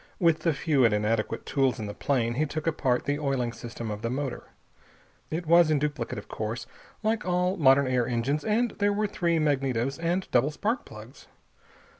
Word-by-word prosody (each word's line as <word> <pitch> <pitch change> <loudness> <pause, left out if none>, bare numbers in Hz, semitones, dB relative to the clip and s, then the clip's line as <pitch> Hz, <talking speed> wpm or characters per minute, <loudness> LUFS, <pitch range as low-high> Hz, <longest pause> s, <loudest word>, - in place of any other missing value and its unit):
With 165 -4 +3
the 165 - +1
few 145 -2 +1
and 115 -3 +4
inadequate 110 +1 -1
tools 135 -4 +1
in 110 - -4
the 105 - -5
plane 120 -3 0
he 150 +5 0
took 155 +2 -4
apart 135 -6 0
the 145 +1 0
oiling 135 -5 -1
system 115 -1 -6
of 105 0 -5
the 115 - -2
motor. 135 +1 -3 0.8
It 165 +2 -3
was 170 0 +6
in 155 - +3
duplicate, 145 -6 -2
of 100 - -8
course, 110 +3 -4 0.4
like 220 0 0
all 180 +1 +1
modern 140 -5 +5
air 125 -2 +1
engines, 130 +5 -1
and 225 +2 +1
there 205 0 +2
were 210 +1 0
three 170 -4 0
magnetos, 135 -3 0
and 175 +3 -1
double 125 +4 +3
spark 215 - -2
plugs. 110 +3 -12
140 Hz, 190 wpm, -27 LUFS, 120-165 Hz, 0.8 s, was